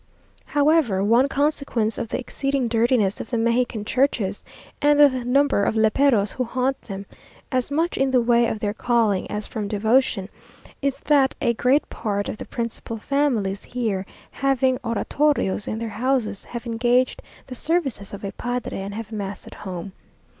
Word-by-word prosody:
However, 290 -10 +2
one 235 +6 +4
consequence 275 -6 0
of 230 - -4
the - - -1
exceeding 275 0 -1
dirtiness 230 -3 +2
of - - -8
the 240 - -1
Mexican 235 -1 0
churches, 220 -6 0 0.4
and 295 0 +4
the 290 -1 +9
number 270 -3 +3
of 220 - +1
léperos 220 -1 +3
who 255 - -1
haunt 255 +2 -1
them, 195 -1 -7 0.5
as 255 -1 0
much 325 +4 0
in 270 0 +3
the 260 -1 +4
way 235 0 +3
of 220 - -3
their 205 -1 -1
calling 225 -4 +1
as 210 0 -3
from 210 -2 -4
devotion, 220 -1 +1 0.5
is 275 -1 -1
that 280 -3 +3
a 235 - +2
great 255 +5 +2
part 205 -2 -2
of - - -5
the - - -6
principal 230 -1 -5
families 225 -7 0
here, 215 -6 -2 0.2
having 265 -2 +1
oratorios 230 -2 0
in 215 - -2
their 230 0 -4
houses, 220 -2 -1
have 235 0 -7
engaged 245 +2 +1 0.2
the 255 - -8
services 270 - -1
of 200 - -8
a 200 - -3
padre, 245 +2 -4
and 200 +1 -5
have 225 -1 -6
mass 200 -2 -5
at - - -11
home. 185 -1 -7
235 Hz, 170 wpm, -23 LUFS, 210-270 Hz, 0.5 s, the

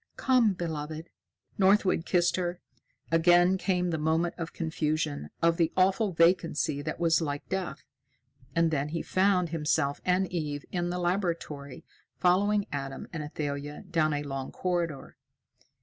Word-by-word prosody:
"Come, 250 -6 +3
beloved." 160 -2 -5 0.5
Northwood 190 -3 +3
kissed 175 -1 +2
her. 175 -1 -2 0.5
Again 175 +3 +5
came 180 -2 0
the 160 - -1
moment 160 +2 +1
of 165 -1 -5
confusion, 155 - -2
of 170 0 +4
the 165 -2 +2
awful 195 +3 +3
vacancy 165 -3 +2
that 155 +2 -4
was 165 -1 +3
like 145 -2 -3
death, 190 -2 -3 0.7
and 165 -1 +3
then 145 -1 -1
he 165 +2 -3
found 185 -2 +2
himself 150 -3 0
and 185 +1 +2
Eve 150 -4 -3
in 175 -1 -1
the 180 - -2
laboratory, 170 -6 -2 0.3
following 200 +3 +3
Adam 135 -1 -5
and 165 - -3
Athalia 145 +1 -5
down 155 -2 +2
a 145 0 -2
long 135 -2 -5
corridor. 170 -5 -3
165 Hz, 140 wpm, -28 LUFS, 150-180 Hz, 0.7 s, Again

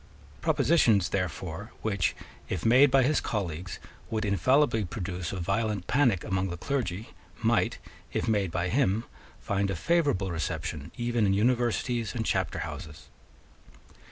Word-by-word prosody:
Propositions, 115 - +3
therefore, 90 +2 -3
which, 100 -4 0 0.3
if 90 -4 -3
made 130 +5 +7
by 135 0 +4
his 145 +3 +2
colleagues, 95 -4 -3 0.3
would 110 0 -1
infallibly 110 - +3
produce 90 -2 -4
a 95 - -4
violent 100 +1 -1
panic 125 -8 +2
among 95 -2 -1
the 85 - -5
clergy, 110 -4 -2 0.3
might, - - +2 0.3
if - - -1
made 100 -4 +1
by 85 +2 -1
him, 115 -3 +2 0.4
find 100 0 -1
a 95 - -1
favourable 120 - +1
reception 80 -2 -4
even 120 -3 +1
in 95 - +3
universities 120 0 +1
and 115 -2 -1
chapter - - 0
houses. 75 0 -9
105 Hz, 135 wpm, -28 LUFS, 95-120 Hz, 0.4 s, made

